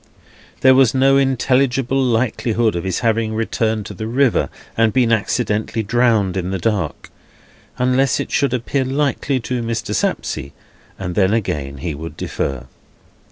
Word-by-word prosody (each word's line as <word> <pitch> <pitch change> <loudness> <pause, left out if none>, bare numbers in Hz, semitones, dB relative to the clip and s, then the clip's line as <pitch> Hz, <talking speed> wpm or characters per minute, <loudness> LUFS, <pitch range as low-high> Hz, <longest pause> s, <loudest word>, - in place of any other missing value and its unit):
There 130 0 +7
was 130 -2 +4
no 135 +1 +4
intelligible 135 0 +1
likelihood 115 -3 +1
of 85 - -2
his 95 -2 -1
having 115 -1 0
returned 110 -1 -1
to 105 - -7
the 110 +3 -5
river, 130 +1 +2 0.3
and 115 -1 +3
been 120 0 +2
accidentally 110 0 0
drowned 110 -4 +2
in 90 -1 -2
the 95 - -1
dark, 90 -6 -2 0.7
unless 130 +1 +2
it - - -4
should 140 -2 +1
appear 130 +2 -1
likely 135 0 0
to 125 +1 -3
Mr. 115 -1 -3
Sapsea, 70 - -2 0.4
and 90 -2 -4
then 95 +3 +2
again 70 -10 -3
he 85 - -1
would 75 +1 -8
defer. 70 -4 -3
115 Hz, 150 wpm, -19 LUFS, 100-130 Hz, 0.7 s, There